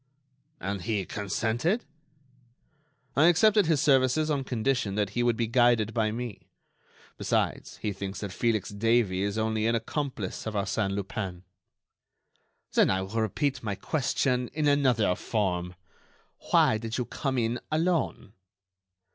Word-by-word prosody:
"And 100 0 -3
he 105 -2 -1
consented?" 115 - -1 1.3
"I 150 - +5
accepted 205 +2 +5
his 160 -3 +3
services 135 +3 +3
on 140 -2 0
condition 125 -4 -1
that 105 -2 0
he 120 - -1
would 120 -2 +2
be 115 - +1
guided 115 -2 +3
by 110 -2 +1
me. 115 -2 -6 0.7
Besides, - - -1
he 105 - -1
thinks 100 0 -6
that 100 -2 -4
Felix 110 -4 0
Davey 105 -2 +1
is 100 +1 -1
only 110 0 0
an 115 - +2
accomplice 115 -4 -3
of 110 - -4
Arsène 100 0 -1
Lupin." 95 -3 -4 1.3
"Then - - +4
I 95 0 +1
will 110 +4 -2
repeat 130 +5 -1
my 105 -3 -3
question 125 0 0
in 150 -1 0
another 130 -9 +3
form. 90 -4 -2 0.7
Why 110 - +4
did 115 0 -4
you 125 - -1
come 135 +1 -3
in 120 0 0
alone?" 160 - 0
115 Hz, 140 wpm, -28 LUFS, 100-130 Hz, 1.3 s, I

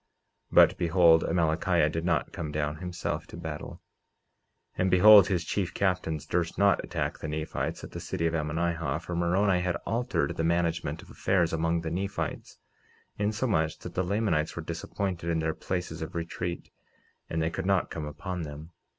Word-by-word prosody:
49:11 - - -9
But - - +7
behold, 85 -1 +5
Amalickiah 85 -1 +2
did 80 +1 -3
not 85 -4 0
come 75 -3 -4
down 75 0 -2
himself 90 +1 -4
to - - -10
battle. 80 -3 -7 0.9
And 95 - +1
behold, 100 +2 +8
his 90 -4 0
chief 95 +1 -2
captains 90 -6 0
durst 85 +1 -1
not 100 +1 +3
attack 80 -3 -3
the - - -5
Nephites 75 +1 -3
at - - -8
the - - -6
city 90 -3 -3
of 80 - +1
Ammonihah, 80 -1 -1
for 85 +1 -4
Moroni 90 +2 +2
had 90 -1 0
altered 120 - -1
the 80 - 0
management 85 0 0
of - - -15
affairs 85 -4 +1
among 80 +1 +1
the 80 -1 -4
Nephites, 100 +4 -4 0.6
insomuch 105 -6 0
that - - -9
the 95 - 0
Lamanites 90 -5 0
were 85 - -5
disappointed 85 +1 -3
in 85 - +1
their 80 0 0
places 90 -3 -4
of 80 - -6
retreat 85 +1 -4 0.6
and 80 - -2
they 80 0 0
could 95 +1 -4
not 95 -2 +2
come 80 -2 -4
upon 90 +5 -5
them. 75 +1 -8
85 Hz, 175 wpm, -28 LUFS, 80-95 Hz, 0.9 s, behold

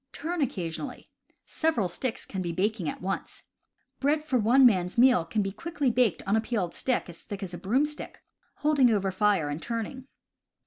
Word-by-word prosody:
Turn 335 +2 -3
occasionally. 220 - -4 0.3
Sev 320 0 0
eral 205 -6 +1
sticks 230 +7 -3
can 190 - -4
be 175 -2 -2
baking 190 -1 -1
at - - -7
once. 195 +1 -4 0.6
Bread 300 +2 +1
for 265 -5 +1
one 245 +5 +5
man's 185 -3 +3
meal 245 -8 +6
can 210 +5 -1
be 195 - -2
quickly 295 - -1
baked 230 -8 +2
on 200 - +2
a 220 - +3
peeled 215 -7 -2
stick 255 -2 -1
as 170 -2 -11
thick 205 -2 -7
as 185 -2 -6
a - - -4
broomstick, 285 +9 -1 0.3
holding 290 -4 +3
over 195 -3 +1
fire 195 -4 +2
and 145 +2 -4
turning. 240 +3 -4
220 Hz, 185 wpm, -28 LUFS, 190-265 Hz, 0.6 s, meal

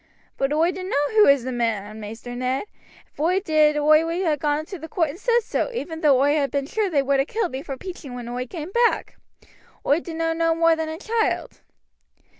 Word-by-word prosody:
"But 270 +1 -1
oi 320 +4 +2
dunno 370 +1 -4 0.2
who 430 -1 +5
is 280 -3 +5
the 260 - -3
man, 220 -3 -2
Maister 225 +3 -8
Ned. 255 +2 -1 0.5
If - - -23
oi 350 +5 +2
did 310 -5 +3
oi 305 +1 +5
would 335 +3 -2
ha' 310 -2 +2
gone 295 0 0
into 345 +4 -8
the 320 - -8
court 330 -3 0
and 345 - -12
said 475 -1 +2
so, 450 - -1
even 325 -8 -5
though 280 -4 +5
oi 290 +1 +3
had 285 -2 +1
been 280 -1 -1
sure 420 +6 -1
they 285 -5 +2
would 275 0 +1
ha' 270 - +1
killed 435 -5 -1
me 265 - -4
for 275 -3 -6
peaching 310 -7 -8
when 245 -1 -7
oi 250 +1 -4
came 325 +4 -7
back. 475 +2 +1 0.7
Oi 290 +3 +3
dunno 330 -1 -2
no 330 0 +1
more 330 0 +4
than 320 -1 -3
a 315 - -5
child." 445 +4 -2
310 Hz, 225 wpm, -23 LUFS, 270-345 Hz, 0.7 s, who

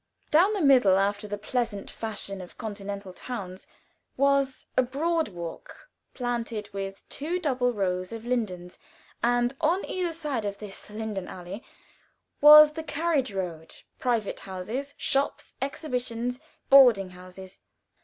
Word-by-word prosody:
Down 360 +7 +5
the 405 - -1
middle, 250 -9 +6
after 205 +2 0
the 205 0 -4
pleasant 210 -1 -3
fashion 200 -3 -4
of 180 - -12
continental 200 -3 -6
towns, 190 -5 -7 0.5
was 275 0 +2
a - - +5
broad 315 +6 0
walk, 175 - -9 0.2
planted 235 -4 -3
with 195 0 -6
two 325 +5 -3
double 255 -7 +1
rows 185 -4 -2
of 225 0 -7
lindens, 190 -8 -3 0.4
and 245 +2 +2
on 335 +5 +2
either 360 -2 -2
side 300 -7 -3
this 205 0 -7
lindenallee 200 -2 -6 0.8
was 300 +1 +10
the 320 - -5
carriage 300 -4 0
road, 175 -5 -5 0.2
private 235 -5 -1
houses, 215 +10 -5
shops, 275 +1 -1
exhibitions, 250 -3 -3 0.3
boarding 240 -9 +7
houses. 185 +1 -11
230 Hz, 125 wpm, -27 LUFS, 195-275 Hz, 0.8 s, was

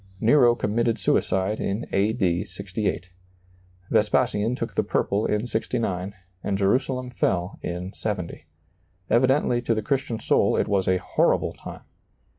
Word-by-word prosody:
Nero 120 +1 +5
committed 115 +1 0
suicide 95 +3 0
in 100 +4 -2
A. 100 +3 +2
D. 95 -7 0
68. 100 -2 -4 0.8
Vespasian 110 +1 +2
took - - -4
the - - +2
purple 100 +2 0
in 105 +2 0
69, 105 -5 -2 0.3
and 100 -1 -1
Jerusalem 125 +5 0
fell 90 -5 -1
in 90 +2 -5
70. 90 -6 -4 0.6
Evidently 130 0 +3
to 120 -2 0
the 110 - -2
Christian 130 -1 -1
soul - - +2
it - - +1
was 95 -2 +1
a 95 - +3
horrible 90 - +1
time. - - -10
105 Hz, 135 wpm, -25 LUFS, 95-120 Hz, 0.8 s, Nero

